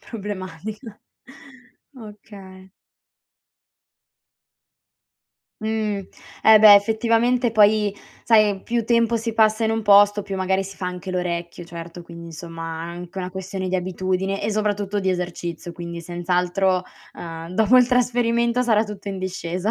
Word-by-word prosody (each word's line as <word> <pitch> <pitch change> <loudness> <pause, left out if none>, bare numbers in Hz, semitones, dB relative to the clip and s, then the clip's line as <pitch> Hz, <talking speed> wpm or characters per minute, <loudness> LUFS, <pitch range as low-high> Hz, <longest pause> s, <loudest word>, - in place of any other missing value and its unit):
Problematica. 205 - -7 1.0
Okay. 200 -4 -13 2.9
Mhmm. 215 -3 -2 0.3
E 220 0 +8
beh, 210 -1 +9
effettivamente 230 +4 +2
poi 210 -1 +4 0.3
sai 215 -4 +3
più 235 0 -1
tempo 235 -1 +2
si 230 0 -3
passa 220 0 +3
in 220 - +1
un 225 0 -1
posto, 205 0 +5
più 195 - -6
magari 190 +1 0
si 195 +1 -9
fa 185 -1 -4
anche 180 +1 -6
l'orecchio, 175 -1 -3
certo 170 +1 -9
quindi 170 0 -11
insomma 165 0 -7
anca 175 +2 -8
una 180 -1 -4
questione 190 0 -5
di 185 - 0
abitudine 185 +1 -2
e 215 - -1
soprattutto 205 -1 -1
di 190 -1 0
esercizio, 175 -1 -4
quindi 170 0 -7
senz'altro, 180 +2 0 0.3
ehm, 165 -1 -8
dopo 220 +5 +4
il 250 -1 +6
trasferimento 240 -1 +1
sarà 225 -3 +2
tutto 210 -1 -8
in 195 -1 -4
discesa. 185 +1 -3
195 Hz, 130 wpm, -22 LUFS, 180-220 Hz, 2.9 s, beh